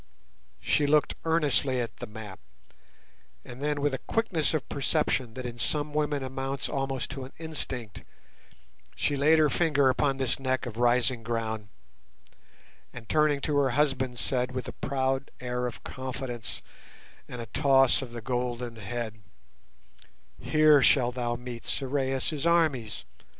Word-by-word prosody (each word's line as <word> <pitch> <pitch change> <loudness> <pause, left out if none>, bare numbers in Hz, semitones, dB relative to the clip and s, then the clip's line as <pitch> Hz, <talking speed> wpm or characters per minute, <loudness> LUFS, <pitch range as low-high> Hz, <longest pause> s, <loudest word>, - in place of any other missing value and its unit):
She 145 - +2
looked 150 +1 +3
earnestly 145 -5 +2
at 120 -2 -4
the - - -6
map, 105 -2 -9 1.1
and 125 +2 -10
then, 145 0 0
with 145 -1 +1
a 130 - -2
quickness 195 -9 0
of 155 - -2
perception 135 -4 0
that 130 -1 -5
in 120 -1 -6
some 145 +3 +1
women 150 -2 0
amounts 135 +1 -3
almost 135 -2 -2
to 135 0 -5
an 130 - -10
instinct, 135 -9 -5 0.9
she 145 - 0
laid 150 +3 +5
her 155 -1 +5
finger 145 -2 +3
upon 135 +1 +1
this 130 -1 0
neck 130 -1 -1
of 115 -3 -6
rising 120 0 +3
ground, 110 -2 -3 1.2
and 115 -2 -10
turning 150 +1 +2
to 150 -1 0
her 140 -2 +3
husband, 130 -4 +1
said, 125 0 0
with 130 -2 -4
a - - -4
proud 135 0 -1
air 125 0 -2
of 120 - -8
confidence 130 -3 -5 0.6
and 125 - -7
a 115 - -4
toss 135 +2 +4
of 130 -3 -7
the 120 -1 -6
golden 120 0 -3
head— 110 0 -5 1.2
"Here 155 -2 +5
shalt 125 -2 +4
thou 120 -1 -1
meet 120 -1 -8
Sorais' 135 +1 -1
armies. 155 -10 +1
130 Hz, 145 wpm, -28 LUFS, 120-145 Hz, 1.2 s, laid